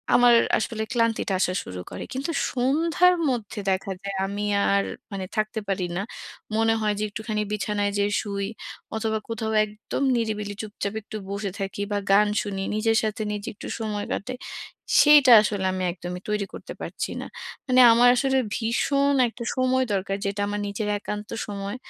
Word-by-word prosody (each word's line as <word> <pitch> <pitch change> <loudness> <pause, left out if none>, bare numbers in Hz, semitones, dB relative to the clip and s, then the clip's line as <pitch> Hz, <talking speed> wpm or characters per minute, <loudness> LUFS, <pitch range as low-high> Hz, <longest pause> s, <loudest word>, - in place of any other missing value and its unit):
আমার 245 -1 +7 0.2
আসলে 220 -1 -2
ক্লান্তিটা 230 -4 +1
আসা 180 0 +1
শুরু 90 0 -7
করে। - - -6
কিন্তু 275 +6 -2 0.2
সন্ধ্যার 325 +8 +3
মধ্যে 230 -3 -3
দেখা 190 +1 -1
যায় 200 -1 -4
আমি 200 +1 -3 0.3
আর 200 - +3 0.3
মানে 190 -1 -3
থাকতে 215 +1 0
পারি 185 -2 0
না। - - 0 0.6
মনে 225 0 +3
হয়, 210 -1 +1
যে - - -1
একটুখানি 215 0 -3
বিছানায় 205 -1 -1
যেয়ে 205 0 +1
শুই। 200 -1 -3 0.5
অথবা 220 -1 -1
কোথাও 220 -1 -2
একদম 210 +6 -5
নিরিবিলি 210 -3 -2
চুপচাপ 205 -1 -4
একটু 215 - -10
বসে 200 -1 -3
থাকি 195 +1 -4
বা 205 - +1
গান 210 +1 +6
শুনি। 195 -2 -4
নিজের 225 +1 +2
সাথে 215 0 -2
নিজে 205 -1 -5
একটু - - -8
সময় 210 -2 -3
কাটাই। 255 +4 -4 0.6
সেইটা 295 -4 +7
আসলে 205 -3 -1
আমি 185 0 -2
একদমই 180 0 -7
তৈরি 210 -1 0
করতে - - -8
পারছি - - -4
না। - - -6 0.4
মানে 255 0 +6
আমার 245 +1 +6
আসলে 265 +1 +2 0.2
ভীষণ 275 +5 +1
একটা 235 +1 -7
সময় 255 0 +2
দরকার, 195 0 -1
যেটা 200 +1 -2
আমার 205 0 -2
নিজের 205 +1 -3
একান্ত 210 +1 -5 0.2
সময়। 200 +2 -4
215 Hz, 165 wpm, -25 LUFS, 200-235 Hz, 0.6 s, আমার